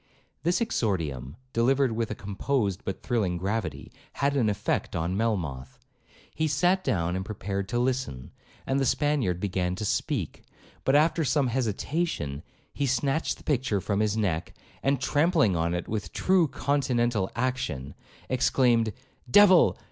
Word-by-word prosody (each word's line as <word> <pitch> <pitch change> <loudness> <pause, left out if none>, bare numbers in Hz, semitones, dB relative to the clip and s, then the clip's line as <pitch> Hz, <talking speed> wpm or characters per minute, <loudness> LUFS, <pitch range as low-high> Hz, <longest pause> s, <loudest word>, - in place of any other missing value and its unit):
This 175 - +1
exordium, 80 - -1 0.2
delivered 130 +2 +3
with 115 0 -2
a 105 - -3
composed 100 0 -2
but 95 - -5
thrilling 105 -8 0
gravity, 95 -6 -3 0.2
had 140 +1 0
an 120 -6 +2
effect 100 - -1
on 85 +3 -1
Melmoth. 85 - -2 0.6
He 155 - 0
sat 175 +6 +2
down 85 -2 0
and 95 - -2
prepared 100 -1 -4
to 120 - -1
listen, 125 - -2 0.3
and 135 +1 +1
the 135 - +1
Spaniard 140 - +1
began 90 -2 -1
to 105 - -4
speak; - - -2 0.4
but 135 - +3
after 160 +2 +3
some 140 -2 +2
hesitation, 115 - -2 0.3
he 140 - -1
snatched 135 +5 0
the - - -17
picture 125 -8 0
from 100 +1 -1
his 105 0 +1
neck, 90 -7 -1 0.3
and 135 -1 +1
trampling 145 - +2
on 85 +1 0
it 90 - -4
with 110 -1 -4
true 185 -3 +3
continental 125 -7 0
action, 115 - -2 0.3
exclaimed, 120 -3 +2 0.4
'Devil! 190 +3 +6
115 Hz, 145 wpm, -27 LUFS, 95-140 Hz, 0.6 s, Devil